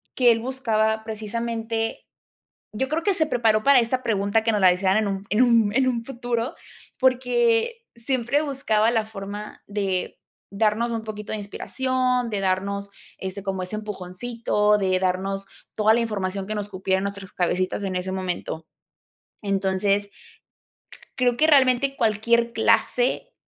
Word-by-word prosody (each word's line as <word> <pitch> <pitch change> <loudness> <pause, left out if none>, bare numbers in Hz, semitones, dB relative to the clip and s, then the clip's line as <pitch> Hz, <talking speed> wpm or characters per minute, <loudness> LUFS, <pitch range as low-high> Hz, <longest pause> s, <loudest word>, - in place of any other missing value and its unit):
que 245 -2 +5
él 225 - +2
buscaba 220 -3 0
precisamente. 225 +1 -3 0.7
Yo 265 +5 -1
creo 320 +2 -1
que 400 - +2
se 315 -3 +1
preparó 225 -6 +2
para 275 -2 +6
esta 255 +2 -1
pregunta 205 0 +1
que 225 - +2
nos 205 - +1
la 185 -1 +7
hicieran 190 +2 +1
en 215 -1 +1
un 195 0 -3
en 220 +5 +4
un 230 -4 +4
en 265 -1 +3
un 235 -2 -1
futuro, 245 +1 -3 0.4
porque 250 - +2
siempre 255 +3 0
buscaba 245 -7 +1
la 225 -2 +1
forma 205 0 -8
de 195 -3 -2 0.3
darnos 220 +3 +1
un 225 -1 -3
poquito 210 -1 -7
de - - -2
inspiración, 250 +3 -1
de 205 -2 -2
darnos, 200 +1 -1 0.3
este, 190 +1 -6
como 190 -2 -3
ese 185 +4 -5
empujoncito, 210 +1 -1
de 185 -2 +1
darnos 195 +1 -1 0.3
toda 215 +1 +4
la 235 - +3
información 195 -3 -2
que 215 - -3
nos 205 0 -4
cupiera 190 0 0
en - - -4
nuestras 200 0 -6
cabecitas 185 +2 -1
en 190 -2 -2
ese 185 +1 -2
momento, 180 -3 -4 0.8
entonces, 200 0 0 1.1
creo 245 -2 +2
que 315 - +4
realmente 275 -2 +4
cualquier 235 +2 +2
clase - - +1
220 Hz, 155 wpm, -24 LUFS, 195-240 Hz, 1.1 s, la